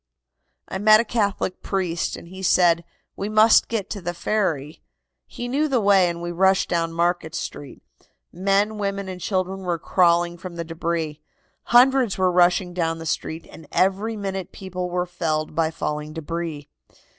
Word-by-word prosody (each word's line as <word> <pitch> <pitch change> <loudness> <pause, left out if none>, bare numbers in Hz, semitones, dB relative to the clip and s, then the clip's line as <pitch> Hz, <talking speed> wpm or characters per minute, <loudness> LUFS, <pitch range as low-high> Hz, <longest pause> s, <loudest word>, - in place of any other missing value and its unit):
"I 190 - -4
met 215 +1 +7
a 230 - +1
Catholic 205 -5 -1
priest, 180 -3 -2
and 170 - -12
he 190 +1 -9
said: 175 -2 +3 0.3
'We 200 - -4
must 215 +1 +5
get 220 -4 -2
to 200 - -4
the 175 0 -4
ferry.' 165 -7 -2 0.5
He 240 - -6
knew 285 +5 +1
the 265 -4 +1
way, 195 -4 +4
and 170 0 -5
we 175 - -3
rushed 190 +2 +2
down 165 -1 0
Market 170 -1 -1
Street. 145 -3 -7 0.5
Men, 200 +4 +1
women 200 -1 -2
and 185 -1 -7
children 190 0 -1
were 180 -3 -2
crawling 175 0 +2
from 180 -1 -8
the 170 - -3
debris. 165 -2 -3 0.4
Hundreds 250 -2 +4
were 185 -1 +2
rushing 180 0 +3
down 165 -2 -1
the 165 - -8
street, 160 +1 -3
and 160 - -13
every 200 +4 +1
minute 195 -2 -4
people 185 -1 -5
were 180 0 -1
felled 160 -4 -2
by 160 0 +1
falling 150 -1 -4
debris. 160 -2 -5
180 Hz, 170 wpm, -23 LUFS, 165-200 Hz, 0.5 s, met